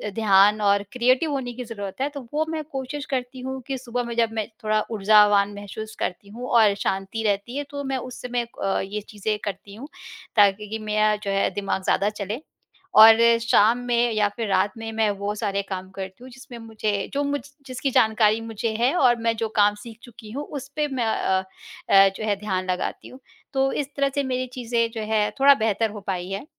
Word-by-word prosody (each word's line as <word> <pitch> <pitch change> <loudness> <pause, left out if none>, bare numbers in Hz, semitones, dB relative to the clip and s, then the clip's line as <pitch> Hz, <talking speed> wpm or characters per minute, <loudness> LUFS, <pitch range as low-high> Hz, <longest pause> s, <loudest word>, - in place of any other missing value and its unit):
ध्यान 210 -1 +4
और 200 -1 +3
क्रिएटिव 255 +5 +2
होने 260 -3 -3
की 250 +1 -6
ज़रूरत 205 -1 -7
है, 280 - +1
तो 285 -1 -8
वो 310 +1 +1
मैं 320 -1 -3
कोशिश 275 +2 -5
करती 255 -1 -3
हूँ 265 +1 -5
कि 270 -1 -2
सुबह 245 -1 -3
में 235 -1 -5
जब 230 -1 +2
मैं 220 -2 -2 0.2
थोड़ा 215 0 +2
ऊर्जावान 205 -1 +4
महसूस 210 +2 -8
करती 200 +2 -4
हूँ 240 +4 -7
और 220 -4 +5
शांति 195 +3 -3
रहती 205 +6 -1
है 290 - -1
तो 285 -1 -5
मैं 270 -1 -2
उस 255 0 -8
समय 245 -1 -2 0.2
अ, 195 0 +1
ये 205 +2 -4
चीज़ें 210 +1 -3
करती 200 0 -6
हूँ 255 +7 -9 0.5
ताकि 205 0 +4
कि 220 +1 -4
मेरा 215 0 +1
जो 205 -1 -4
है 195 0 +1
दिमाग 195 -1 -2
ज़्यादा 200 +2 +2
चले। 210 +4 -5 0.6
और 225 0 +10 0.2
शाम 230 0 +4
में 240 0 +2
या 210 -1 +2
फिर 230 -2 -3
रात 195 +1 +2
में 225 0 -6
मैं 220 -1 +2
वो 200 +1 -2
सारे 200 -2 -1
काम 185 -1 -5
करती 190 +3 -8
हूँ, 260 - -10
जिसमें 255 -1 -11
मुझे 215 -3 -3
जो 285 +1 0
मुझ 285 0 -1 0.3
जिसकी 260 +1 -2
जानकारी 220 -1 +3
मुझे 225 0 -3
है 245 +5 +3
और 255 -8 +4
मैं 230 0 +1
जो 225 0 -1
काम 205 0 +4
सीख 230 -2 -11
चुकी 230 -3 -12
हूँ 285 +4 -4 0.2
उस 265 - -10
पे 300 -1 0
मैं 260 -4 -2
अ 190 -3 +1 0.5
अ, 195 0 +7
जो - - -5
है 205 - +2
ध्यान 190 -3 -2
लगाती 180 - -4
हूँ। 255 - -13 0.3
तो 270 0 +2
इस 285 - -2
तरह 280 0 +2
से 285 - +1
मेरी 255 -1 -2
चीज़ें 235 -2 0
जो 225 -1 -5
है 210 -1 +2
थोड़ा 280 +1 +8
बेहतर 225 -2 0
हो 210 -1 -8
पाई 180 -2 -2
है 195 +1 -3
उम, - - -14
220 Hz, 215 wpm, -24 LUFS, 205-250 Hz, 0.6 s, और